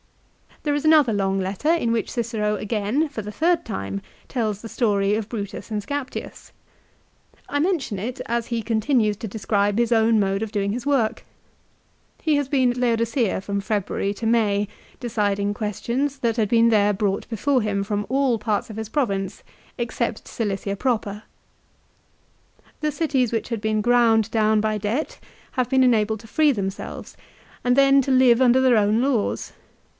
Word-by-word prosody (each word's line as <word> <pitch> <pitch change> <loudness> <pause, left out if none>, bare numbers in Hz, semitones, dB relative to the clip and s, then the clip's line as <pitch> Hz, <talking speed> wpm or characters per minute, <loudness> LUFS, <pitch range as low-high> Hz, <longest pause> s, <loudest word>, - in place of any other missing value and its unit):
There 295 - 0
is 290 +1 -2
another 305 -7 +5
long 195 -1 0
letter 195 +10 -2
in 325 -9 +1
which 230 -2 -1
Cicero 220 -3 -1
again, 215 +8 -1
for 260 -6 -5
the 210 - -6
third 330 +9 +1
time, 95 - -4 0.3
tells 215 -5 -2
the 225 - -8
story 205 -4 +1
of 220 -1 -3
Brutus 205 -3 -6
and 210 -1 -1
Scaptius. 285 +5 -6 1.0
1 285 - -2
I - - +1
men 350 +3 +2
tion 210 -7 -5
it, 240 +6 -5
as 235 0 -1
he 235 -1 -2
continues 220 0 +1
to 220 - -6
describe 205 -1 0
his 235 0 +1
own 225 -1 +4
mode 195 0 0
of 220 - -5
doing 200 -2 -1
his 240 +4 -4
work. 240 -6 +1 1.0
He 310 -2 +2
has 285 -2 0
been 260 -3 +2
at 245 - -6
Laodicea 230 -3 +1
from 200 +1 -3
February 200 -1 -1
to 225 - -3
May, 210 -3 +2 0.3
deciding 205 -4 -1
questions 240 +7 -2
that 230 -2 0
had 215 -3 +1
been 230 0 +4
there 210 -2 +3
brought 200 0 -1
before 255 +3 +1
him 200 -2 -1
from 205 0 -2
all 265 -2 +2
parts 210 0 -1
of 215 - -9
his 220 -1 -5
province 200 -8 -2 0.4
except 235 -1 -3
Cilicia 200 -2 -3
proper. 215 -3 -2 1.6
The 305 0 0
cities 280 -6 0
which 230 0 -2
had 230 -3 -3
been 215 0 0
ground 225 -2 +3
down 215 -1 +3
by 215 0 0
debt 255 - -2 0.3
have 255 -3 0
been 265 -1 +4
enabled 220 -3 +2
to 225 - -14
free 300 +5 +3
themselves, 195 -5 -5 0.5
and 245 0 +3
then 275 0 +5
to 270 - -1
live 255 -2 +5
under 255 0 +5
their 255 -3 +4
own 210 +2 +3
laws. 255 -5 -1
225 Hz, 175 wpm, -23 LUFS, 205-255 Hz, 1.6 s, another